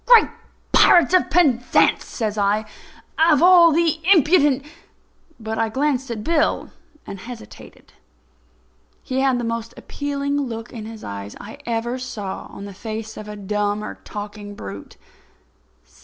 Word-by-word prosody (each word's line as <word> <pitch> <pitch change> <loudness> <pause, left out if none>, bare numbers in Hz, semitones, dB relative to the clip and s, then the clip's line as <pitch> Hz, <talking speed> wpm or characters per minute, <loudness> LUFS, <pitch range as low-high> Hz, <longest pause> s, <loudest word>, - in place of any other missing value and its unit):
"Great 480 -3 +7 0.4
pirates 345 0 +6
of 370 - +4
Penzance!" 265 -9 +3
says 215 -3 -3
I; 210 +1 +1 0.5
"of 320 -2 +5
all 350 -2 +7
the 325 0 +2
impudent—" 295 -6 +4 0.8
But 220 0 -4
I 225 -1 +1
glanced 265 +1 -1
at 220 -3 -4
Bill, 325 +1 0 0.3
and 195 - -8
hesitated. 235 +3 -12 1.1
He 260 -2 -2
had 265 -2 +2
the - - -3
most 230 0 -4
appealing 285 0 -3
look 230 -4 -6
in 220 -3 -7
his 225 -1 -10
eyes 100 0 -7
I 215 - -10
ever 235 +2 -2
saw 210 -6 -6
on 200 - -9
the 200 - -9
face 220 +2 -6
of 210 - -9
a 210 - -7
dumb 205 +1 -2
or - - -5
a - - -11
talking 205 0 -8
brute. 100 - -9
230 Hz, 145 wpm, -21 LUFS, 210-285 Hz, 1.1 s, Great